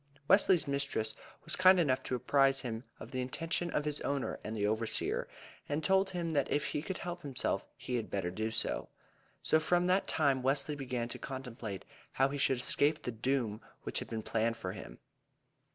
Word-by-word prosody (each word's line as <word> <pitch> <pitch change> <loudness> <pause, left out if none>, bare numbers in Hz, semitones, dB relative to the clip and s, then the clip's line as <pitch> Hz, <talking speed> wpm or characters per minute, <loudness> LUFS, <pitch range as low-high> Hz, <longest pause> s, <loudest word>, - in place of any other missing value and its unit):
Wesley's 190 -4 +5
mistress 140 -6 0 0.3
was - - -2
kind 185 0 +7
enough 135 -6 +2
to 130 - -1
apprise 135 +2 +3
him 115 -1 -4
of - - -9
the 130 - -1
intention 165 +7 -1
of 150 -2 -1
his 150 -1 -1
owner 140 -1 -1
and 110 - -4
the 105 -1 0
overseer, 110 +2 0 0.4
and 145 +2 -1
told 190 +2 +3
him 170 -3 -2
that 140 -3 +1
if 145 - +1
he 145 - -2
could 185 +4 -4
help 175 0 -5
himself 140 -4 -1
he 125 - -2
had 110 -2 -4
better 95 -3 -1
do 110 +4 -2
so. 115 - -2 0.5
So 155 - +4
from 175 +3 +2
that 185 +2 +2
time 140 -4 +2
Wesley 135 +3 +1
began 125 -4 -3
to - - -6
contemplate 120 -7 -6 0.3
how 135 +1 +3
he 145 +1 -4
should 135 -1 +3
escape 145 +5 +2
the 125 - -2
doom 115 -2 -1 0.2
which - - -1
had - - -7
been 110 -1 -3
planned 115 +1 0
for 95 -5 -4
him. - - -9
135 Hz, 195 wpm, -33 LUFS, 115-155 Hz, 0.5 s, kind